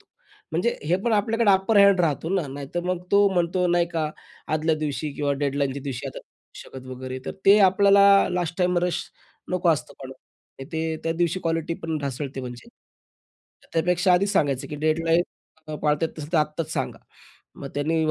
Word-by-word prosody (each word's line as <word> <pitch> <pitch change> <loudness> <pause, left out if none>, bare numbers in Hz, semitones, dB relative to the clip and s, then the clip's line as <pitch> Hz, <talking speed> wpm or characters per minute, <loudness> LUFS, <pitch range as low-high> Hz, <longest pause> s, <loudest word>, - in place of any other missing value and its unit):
तू." - - -29 0.5
म्हणजे 180 +9 0
हे 170 +4 +2
पण 235 - +1
आपल्याकडे 220 +1 +2
अपर 195 +3 +2
हँड 200 -2 +6
राहतो 160 -1 0
ना. 175 -6 0
नाहीतर 140 +5 -5
मग 180 -1 -2
तो 200 0 +6
म्हणतो 180 +1 +1
नाही 175 0 +2
का, 160 -3 -2 0.4
आदल्या 155 +1 +1
दिवशी 150 -1 -3
किंवा 145 -1 -1
डेडलाईनच्या 140 -1 -1
दिवशी 135 -4 -5
आता - - -7
नाही - - -14 0.5
करू 130 - -9
शकत 130 - -15
वगैरे. 130 0 -6
तर - - -3
ते 200 +2 +8
आपल्याला 200 0 +5
लास्टटाईम 180 0 0
रश 180 - -2 0.5
नको 180 -1 +1
असतं. 150 - -1
पण 130 - -8 0.6
ते 160 0 -2
त्या 165 - +1
दिवशी 175 +2 -1
क्वालिटी 165 0 -1
पण 160 -1 -2
ढासळते 140 -1 -4
म्हणजे. 125 - -9 1.0
त्यापेक्षा 180 +3 +2
आधीच 195 +3 +3
सांगायचं 140 - 0
की 150 - -6
"डेडलाईन्स 165 +3 +1 0.4
नाही 155 -1 -5
पाळत 150 +1 +1
येत 165 - +2
नसेल, 155 +2 -8
तर 165 - +4
आत्ताच 150 +1 -2
सांगा." - - -3 0.6
मग 140 - -6
त्यांनी 160 +3 0
165 Hz, 180 wpm, -24 LUFS, 145-180 Hz, 1.0 s, ते